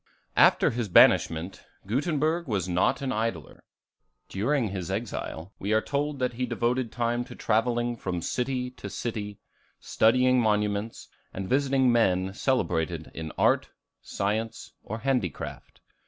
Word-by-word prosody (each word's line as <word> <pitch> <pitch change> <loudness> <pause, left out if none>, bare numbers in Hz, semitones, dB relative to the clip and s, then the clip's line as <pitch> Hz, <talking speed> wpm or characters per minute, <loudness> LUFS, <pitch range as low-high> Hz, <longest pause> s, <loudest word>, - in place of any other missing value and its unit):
After - - +5
his 115 -3 -3
banishment, 85 0 +4 0.2
Gutenberg 155 - 0
was 100 -6 -1
not 90 +9 +1
an 135 - -1
idler. 110 - -3 0.7
During 115 +4 0
his 95 -3 -5
exile, 100 -3 -4
we 100 +3 -1
are 110 - +5
told 145 +4 -2
that 125 -2 -1
he 125 +2 -2
devoted 120 0 -1
time 120 0 -1
to - - -11
travelling 120 +2 0
from 90 -6 -4
city 125 0 -2
to 115 -5 -8
city, 105 -2 -4 0.4
studying 125 +2 +3
monuments, 105 0 -1 0.3
and 95 0 -4
visiting 135 0 +3
men 95 -5 +2
celebrated 85 - -1
in 80 -1 -6
art, - - +2 0.3
science, 110 +3 -3
or 110 - -6
handicraft. 125 - -3
115 Hz, 130 wpm, -27 LUFS, 95-125 Hz, 0.7 s, After